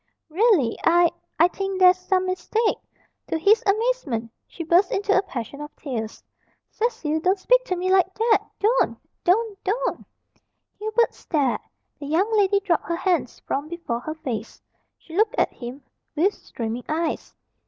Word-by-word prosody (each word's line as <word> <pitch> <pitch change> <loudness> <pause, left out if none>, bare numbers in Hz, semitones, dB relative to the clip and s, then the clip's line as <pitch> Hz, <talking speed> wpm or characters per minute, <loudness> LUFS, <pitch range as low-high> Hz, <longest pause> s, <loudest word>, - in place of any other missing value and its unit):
"Really 335 - +3
I 345 0 +5 0.3
I 335 - +6
think 390 +1 -4
there's 365 -1 +7
some 370 0 +1
mistake 430 +4 0 0.3
" - - -45
To - - -1
his 400 +7 +4
amazement 395 - 0 0.2
she 335 - -7
burst 350 +4 +3
into 405 0 +1
a 380 - +5
passion 280 - -6
of 295 +1 -9
tears. 225 -7 -5 0.5
"Cecil, 435 -10 -1
don't 370 +4 +2
speak - - +3
to 370 - -1
me 365 +1 -1
like 375 -1 +4
that 450 0 +3
don't! 460 +4 +2 0.3
don't! 405 +2 +1
don't!" 480 +6 -1 0.8
Hubert 435 +2 +1
stared. 285 -7 -1 0.4
The 285 - -7
young 380 +9 +1
lady 400 -1 +4
dropped 360 -5 0
her 335 - 0
hands 335 - -1
from 285 +2 -3
before 330 -8 -4
her 310 +5 -6
face. 240 -8 -5 0.4
She 325 - -12
looked 430 +2 +2
at - - +2
him 250 +3 -8 0.3
with 380 +7 +3
streaming 230 +1 -6
eyes. 320 +1 -2
360 Hz, 160 wpm, -24 LUFS, 300-410 Hz, 0.8 s, there's